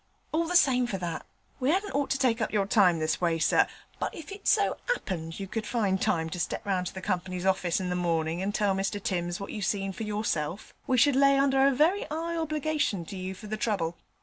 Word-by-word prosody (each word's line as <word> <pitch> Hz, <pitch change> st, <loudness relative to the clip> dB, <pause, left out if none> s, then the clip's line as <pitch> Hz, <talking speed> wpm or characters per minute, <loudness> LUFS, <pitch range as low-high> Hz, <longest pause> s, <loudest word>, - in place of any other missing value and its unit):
All 330 Hz, +1 st, +1 dB
the 355 Hz, -, -2 dB
same 250 Hz, -7 st, +4 dB
for 200 Hz, -, -2 dB
that, 175 Hz, -3 st, -5 dB, 0.3 s
we 260 Hz, +2 st, +2 dB
'adn't 390 Hz, +3 st, 0 dB
ought 285 Hz, 0 st, 0 dB
to 270 Hz, -, +1 dB
take 245 Hz, -4 st, +1 dB
up 220 Hz, -, -1 dB
your 205 Hz, -2 st, +1 dB
time 195 Hz, -4 st, +4 dB
this 155 Hz, +2 st, -1 dB
way, 170 Hz, -2 st, +2 dB
sir; 160 Hz, -, +3 dB, 0.3 s
but -, -, -1 dB
if 330 Hz, +3 st, -9 dB
it 400 Hz, +1 st, -8 dB
so -, -, +3 dB, 0.2 s
'appened 165 Hz, -, -5 dB
you 195 Hz, -, -3 dB
could 215 Hz, +3 st, -4 dB
find 200 Hz, -6 st, 0 dB
time 160 Hz, -1 st, +1 dB
to 180 Hz, -, -4 dB
step 175 Hz, -, -3 dB
round 185 Hz, -2 st, 0 dB
to -, -, -6 dB
the 190 Hz, -, -7 dB
Company's 185 Hz, -1 st, -2 dB
orfice 185 Hz, -3 st, +1 dB
in 180 Hz, -1 st, -2 dB
the -, -, 0 dB
morning 165 Hz, -1 st, 0 dB
and 205 Hz, +2 st, -2 dB
tell 205 Hz, -2 st, +2 dB
Mr 195 Hz, +2 st, -1 dB
Timms 175 Hz, -3 st, -2 dB
what 200 Hz, -, -6 dB
you 210 Hz, -, -5 dB
seen 195 Hz, -1 st, -1 dB
for -, -, -9 dB
yourself, 205 Hz, -5 st, -2 dB
we 255 Hz, -, +2 dB
should 280 Hz, +3 st, +5 dB
lay 275 Hz, 0 st, +5 dB
under 270 Hz, 0 st, +4 dB
a -, -, +4 dB
very 315 Hz, +9 st, +2 dB
'igh 325 Hz, +2 st, -3 dB
obligation 305 Hz, -, -1 dB
to 195 Hz, -, -8 dB
you 185 Hz, 0 st, -5 dB
for 215 Hz, -, -11 dB
the 215 Hz, +1 st, -3 dB
trouble. 195 Hz, -7 st, -1 dB
200 Hz, 240 wpm, -28 LUFS, 180-270 Hz, 0.3 s, should